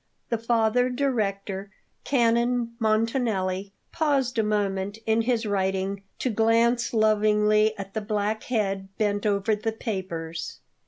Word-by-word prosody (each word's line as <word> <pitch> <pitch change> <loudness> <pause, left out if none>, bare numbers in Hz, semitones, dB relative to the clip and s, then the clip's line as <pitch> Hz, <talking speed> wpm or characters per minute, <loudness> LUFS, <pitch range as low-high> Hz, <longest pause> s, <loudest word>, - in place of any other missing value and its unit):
The 230 - 0
Father 230 +2 +2
Director, 205 -7 -2 0.4
Canon 235 -1 +2
Montanelli, 215 -4 0 0.2
paused 275 -7 +1
a - - +3
moment 200 -1 -1
in 220 +1 +2
his 230 -1 0
writing 195 -1 -1 0.2
to 255 - -1
glance 230 +2 +2
lovingly 215 0 +3
at 195 -1 -7
the 220 - -2
black 210 +1 -2
head 195 -5 -1
bent 205 0 0
over 200 +1 +1
the 225 +2 -2
papers. 175 -7 -5
215 Hz, 120 wpm, -26 LUFS, 200-230 Hz, 0.4 s, a